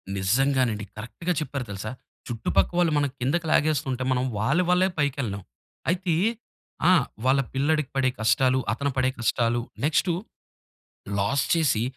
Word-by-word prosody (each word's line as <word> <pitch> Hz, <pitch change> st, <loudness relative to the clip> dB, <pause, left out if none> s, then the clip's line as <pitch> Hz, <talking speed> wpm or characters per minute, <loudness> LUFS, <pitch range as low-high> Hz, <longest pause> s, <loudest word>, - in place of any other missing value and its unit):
నిజ్జంగానండి 115 Hz, +2 st, +1 dB
కరెక్ట్‌గా 165 Hz, +11 st, -3 dB
చెప్పారు 140 Hz, -3 st, -4 dB
తెలుసా. 100 Hz, +3 st, -5 dB, 0.4 s
చుట్టుపక్క 115 Hz, +7 st, 0 dB
వాళ్ళు 170 Hz, -2 st, +3 dB
మనం 145 Hz, -1 st, +1 dB
కిందకి 150 Hz, +7 st, 0 dB
లాగేసుకుంటే 135 Hz, -4 st, +1 dB
మనం 125 Hz, 0 st, +1 dB
వాళ్ళ 140 Hz, -, +2 dB
వల్లే 185 Hz, +1 st, +4 dB
పైకెళ్ళేం. 125 Hz, -9 st, -1 dB, 0.5 s
అయితే 180 Hz, -2 st, 0 dB, 0.7 s
ఆ! -, -, +7 dB, 0.3 s
వాళ్ళ 135 Hz, +1 st, +4 dB
పిల్లాడికి 150 Hz, +1 st, +1 dB
పడే 130 Hz, -1 st, +3 dB
కష్టాలు 125 Hz, +4 st, +3 dB
అతను 140 Hz, +5 st, -1 dB
పడే 130 Hz, 0 st, +3 dB
కష్టాలు 120 Hz, 0 st, +1 dB, 0.2 s
నెక్స్‌టు 160 Hz, +3 st, +2 dB, 1.1 s
లాస్ 135 Hz, +8 st, +1 dB
చేసి 150 Hz, -9 st, +2 dB
130 Hz, 125 wpm, -25 LUFS, 115-155 Hz, 1.1 s, ఆ